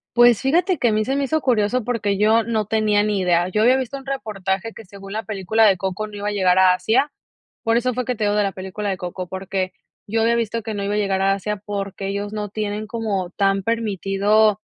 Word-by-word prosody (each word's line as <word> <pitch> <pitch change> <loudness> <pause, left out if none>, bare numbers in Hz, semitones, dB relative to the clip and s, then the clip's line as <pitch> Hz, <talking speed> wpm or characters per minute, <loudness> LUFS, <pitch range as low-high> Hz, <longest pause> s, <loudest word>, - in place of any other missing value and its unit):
Pues, 240 -2 +6
fíjate 350 +7 +2
que 245 -3 +2
a - - +1
mí 215 0 +1
se 270 - -1
me 280 - 0
hizo 315 +3 0
curioso 240 -1 +1
porque 210 -4 -1
yo 220 +2 +4
no 220 -1 -1
tenía 210 -1 +2
ni 205 -2 0
idea, 175 -1 +2
yo 215 +3 +1
había 250 +3 +5
visto 265 +1 -3
un 270 - -12
reportaje 215 -5 -3
que 220 - -12
según 195 +1 -11
la 220 +1 -3
película 215 +2 +1
de 200 -3 +5
Coco 190 +3 -3
no 210 -1 -10
iba 205 0 -4
a 210 - 0
llegar 185 -2 +3
a 185 -1 +6
Asia, 265 +9 +1 0.5
por 225 +1 +2
eso 250 0 0
fue 250 - -2
que 250 - -1
te 215 -1 -1
digo 205 0 +1
de 210 - +3
la 200 - -1
película 190 +2 -5
de 190 - -2
Coco, 180 0 -6
porque 190 0 -3 0.3
yo 225 +2 -1
había 230 +1 +3
visto 230 0 -1
que 220 0 -5
no 200 - -3
iba 200 - -1
a 210 - 0
llegar 195 -2 0
a 195 0 +3
Asia 210 +2 -3
porque 200 -1 -4
ellos 200 +1 -3
no 210 -1 -4
tienen 210 0 -3
como 205 -5 -3
tan 195 0 +1
permitido 210 -1 +1
210 Hz, 250 wpm, -21 LUFS, 195-225 Hz, 0.5 s, Pues